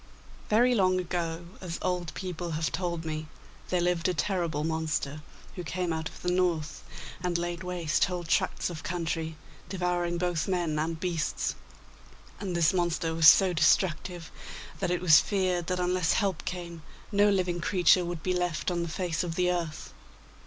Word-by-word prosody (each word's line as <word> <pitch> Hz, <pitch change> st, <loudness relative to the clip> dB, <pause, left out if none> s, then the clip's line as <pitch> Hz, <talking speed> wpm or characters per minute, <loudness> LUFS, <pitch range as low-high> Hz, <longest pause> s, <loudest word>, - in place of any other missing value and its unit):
Very 240 Hz, +4 st, +4 dB
long 185 Hz, -4 st, +3 dB
ago, 170 Hz, -1 st, -3 dB, 0.2 s
as 170 Hz, -3 st, -4 dB
old 180 Hz, -2 st, -1 dB
people 180 Hz, -2 st, -4 dB
have 160 Hz, +1 st, -1 dB
told 170 Hz, -3 st, -2 dB
me, 155 Hz, 0 st, -4 dB, 0.4 s
there 180 Hz, -, +1 dB
lived 175 Hz, -1 st, +1 dB
a 180 Hz, -, 0 dB
terrible 170 Hz, -4 st, -1 dB
monster, 155 Hz, -2 st, -2 dB, 0.3 s
who 180 Hz, -, -5 dB
came 175 Hz, +2 st, -2 dB
out 160 Hz, 0 st, -3 dB
of -, -, -14 dB
the 180 Hz, -, +1 dB
North, 170 Hz, -4 st, 0 dB, 0.4 s
and 175 Hz, -1 st, 0 dB
laid 175 Hz, 0 st, -3 dB
waste 175 Hz, -3 st, +1 dB
whole 180 Hz, -1 st, -4 dB
tracts 170 Hz, +2 st, 0 dB
of 160 Hz, -2 st, -7 dB
country, 165 Hz, -2 st, -3 dB, 0.3 s
devouring 175 Hz, -2 st, -1 dB
both 175 Hz, -2 st, -1 dB
men 175 Hz, -5 st, 0 dB
and 160 Hz, +1 st, -2 dB
beasts; 170 Hz, -3 st, -1 dB, 0.9 s
and 190 Hz, -4 st, -3 dB
this 170 Hz, 0 st, +3 dB
monster 170 Hz, -2 st, 0 dB
was 160 Hz, -1 st, +5 dB
so 190 Hz, 0 st, +8 dB
destructive 175 Hz, 0 st, +1 dB, 0.5 s
that -, -, -1 dB
it 180 Hz, 0 st, 0 dB
was 160 Hz, -4 st, +8 dB
feared 185 Hz, -4 st, 0 dB
that 180 Hz, 0 st, -1 dB
unless 180 Hz, -1 st, +2 dB
help 195 Hz, -6 st, 0 dB
came 170 Hz, -2 st, -5 dB, 0.3 s
no 205 Hz, 0 st, +4 dB
living 180 Hz, -3 st, 0 dB
creature 180 Hz, -1 st, +4 dB
would 170 Hz, -2 st, -5 dB
be 185 Hz, -, +1 dB
left 180 Hz, -1 st, -1 dB
on 175 Hz, -1 st, -1 dB
the 170 Hz, -, -3 dB
face 175 Hz, 0 st, -2 dB
of 170 Hz, -2 st, -4 dB
the 180 Hz, 0 st, +2 dB
earth. 165 Hz, -3 st, -4 dB
175 Hz, 170 wpm, -28 LUFS, 165-180 Hz, 0.9 s, so